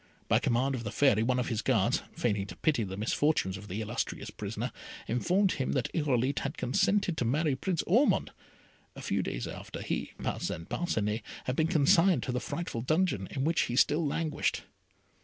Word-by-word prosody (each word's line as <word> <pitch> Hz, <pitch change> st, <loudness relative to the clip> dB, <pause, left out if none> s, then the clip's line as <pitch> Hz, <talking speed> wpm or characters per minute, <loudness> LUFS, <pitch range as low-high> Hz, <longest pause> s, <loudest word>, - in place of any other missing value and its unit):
By -, -, +4 dB
command 130 Hz, +3 st, +1 dB
of 125 Hz, -3 st, -3 dB
the 105 Hz, -, -3 dB
Fairy, 110 Hz, 0 st, +3 dB
one 125 Hz, +2 st, +1 dB
of 125 Hz, -, -1 dB
his 115 Hz, -1 st, -1 dB
guards, 115 Hz, -7 st, +2 dB
feigning 105 Hz, -4 st, 0 dB
to -, -, -8 dB
pity 145 Hz, -7 st, +1 dB
the 95 Hz, -1 st, -5 dB
misfortunes 110 Hz, -2 st, +1 dB
of 100 Hz, +2 st, -9 dB
the 105 Hz, +3 st, -4 dB
illustrious 110 Hz, +2 st, -3 dB
prisoner, -, -, -4 dB, 0.4 s
informed 180 Hz, -, +2 dB
him 130 Hz, -, -1 dB
that 130 Hz, -4 st, -1 dB
Irolite 140 Hz, -3 st, +1 dB
had 140 Hz, -, -4 dB
consented 185 Hz, +7 st, +1 dB
to -, -, 0 dB
marry 145 Hz, +4 st, +1 dB
Prince 170 Hz, +4 st, -1 dB
Ormond, 240 Hz, +11 st, +3 dB, 0.6 s
a -, -, -8 dB
few -, -, 0 dB
days -, -, -3 dB
after -, -, -7 dB
he -, -, -3 dB
(Parcin -, -, -3 dB
Parcinet) 110 Hz, -10 st, -1 dB, 0.2 s
had 125 Hz, -, -2 dB
been 160 Hz, +2 st, +2 dB
consigned 170 Hz, +3 st, +4 dB
to 130 Hz, -, -2 dB
the 125 Hz, -, -1 dB
frightful 145 Hz, -5 st, -4 dB
dungeon 155 Hz, -, +1 dB
in 135 Hz, -, -3 dB
which 165 Hz, +3 st, +2 dB
he 120 Hz, -, -1 dB
still 150 Hz, +5 st, +3 dB
languished. 155 Hz, 0 st, -1 dB
130 Hz, 185 wpm, -30 LUFS, 115-160 Hz, 0.6 s, By